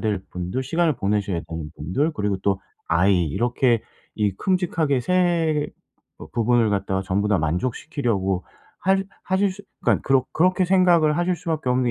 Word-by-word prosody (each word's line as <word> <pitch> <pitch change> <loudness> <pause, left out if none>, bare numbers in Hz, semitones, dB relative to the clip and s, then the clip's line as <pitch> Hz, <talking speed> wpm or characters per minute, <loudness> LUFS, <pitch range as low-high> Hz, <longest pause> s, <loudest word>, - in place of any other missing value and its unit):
될 105 -3 0
분들, 90 +8 -3
시간을 165 +3 +1
보내셔야 100 -4 0
되는 80 -2 -6
분들, 135 - -1
그리고 105 -4 -1
또 100 -1 +1 0.3
아이 90 +1 +3
이렇게 120 - +1 0.3
이 105 -2 +1
큼직하게 165 - 0
3 170 -2 +1 0.6
부분을 115 -1 +2
갖다가 95 -1 -1
전부 100 +2 0
다 105 - +3
만족시키려고 95 - -1 0.3
할 195 +1 +2 0.2
하실 190 +2 +1
수 200 +1 -12 0.2
그러니까 - - +2
그렇 135 -2 +3
그렇게 185 +3 +3
생각을 175 -4 +4
하실 175 0 +1
수밖에 160 -5 -3
없는 125 0 +2
125 Hz, 335 characters per minute, -23 LUFS, -, 0.6 s, 생각을